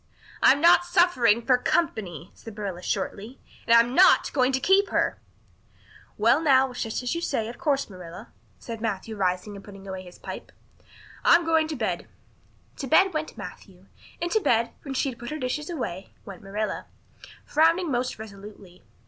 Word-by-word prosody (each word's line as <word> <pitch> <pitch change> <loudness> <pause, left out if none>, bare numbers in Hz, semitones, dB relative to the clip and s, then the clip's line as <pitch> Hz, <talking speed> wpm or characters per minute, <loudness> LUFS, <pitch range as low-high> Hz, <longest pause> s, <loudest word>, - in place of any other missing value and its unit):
"I'm 280 - +6
not 340 +1 +6
suffering 300 - +3
for 250 -2 +4
company," 185 - -2
said 225 -2 -12
Marilla 195 -4 -5
shortly. 205 +6 -4 0.3
"And 230 - +6
I'm 235 +1 +4
not 370 +7 +5
going 255 -2 +2
to 265 - 0
keep 390 +6 +3
her." - - 0 1.0
"Well - - +3
now, 265 -4 +4
it's 245 - -6
just 225 +2 -3
as 250 - -1
you 335 - -3
say, 230 -9 -1
of 235 - -9
course, 285 -5 0
Marilla," 180 +2 -11 0.3
said 230 -2 -8
Matthew 220 0 -3
rising 185 +1 -1
and 200 - -10
putting 195 -1 -12
his 185 -2 -8
pipe - - -8
away. - - -33 0.4
"I'm 340 0 +5
going 320 -1 +2
to 315 - -4
bed." 205 -9 -3 0.7
To 275 - -5
bed 380 +8 +4
went 310 0 -4
Matthew. 185 -1 -11 0.3
And 345 0 -3
to 440 - +3
bed, 230 - +1
when 275 -2 -6
she 275 - 0
had 235 - -9
put 240 - -7
her 305 - -4
dishes 295 +3 -3
away, 200 - -5 0.2
went 195 -3 -10
Marilla, 210 +2 -4 0.6
frowning 330 +2 +2
most 250 0 -1
resolutely. 200 -3 -12
235 Hz, 175 wpm, -25 LUFS, 200-305 Hz, 1.0 s, I'm